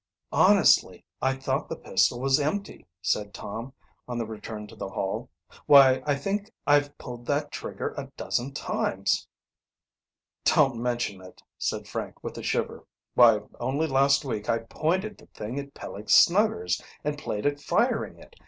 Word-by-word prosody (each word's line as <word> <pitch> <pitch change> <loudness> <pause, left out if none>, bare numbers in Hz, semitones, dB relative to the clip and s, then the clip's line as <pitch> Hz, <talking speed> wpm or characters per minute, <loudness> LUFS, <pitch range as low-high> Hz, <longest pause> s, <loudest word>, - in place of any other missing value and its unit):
"Honestly, - - +4 0.2
I 135 0 +2
thought 135 - -2
the - - -3
pistol 120 - +1
was 135 +2 +3
empty," 175 +8 -3 0.2
said 105 +3 -1
Tom, 115 +6 -6 0.4
on 120 -1 -4
the 115 - -1
return 110 -1 -7
to 110 +2 -13
the 100 - -5
Hall. 95 0 -3 0.4
"Why, 135 -2 +8
I 145 - +3
think 200 +8 -3
I've 145 0 +3
pulled 120 -1 -9
that 145 0 0
trigger - - -5
a - - -5
dozen 125 +3 -2
times." 145 - -1 1.2
"Don't 135 -5 +4
mention 120 -5 -2
it," 90 0 -14 0.2
said - - -2
Frank - - -6
with - - -5
a - - -6
shiver. - - -2 0.3
"Why, 115 -4 +6 0.2
only 135 +6 0
last 140 -1 +3
week 110 -5 -4
I 115 - +3
pointed 175 - -2
the - - -17
thing 115 +6 -4
at 140 0 -9
Peleg 105 +2 -8
Snuggers 195 - +4 0.2
and 150 0 -1
played 105 -8 -4
at 145 0 +1
firing - - 0
it. - - -16
135 Hz, 160 wpm, -27 LUFS, 115-145 Hz, 1.2 s, Why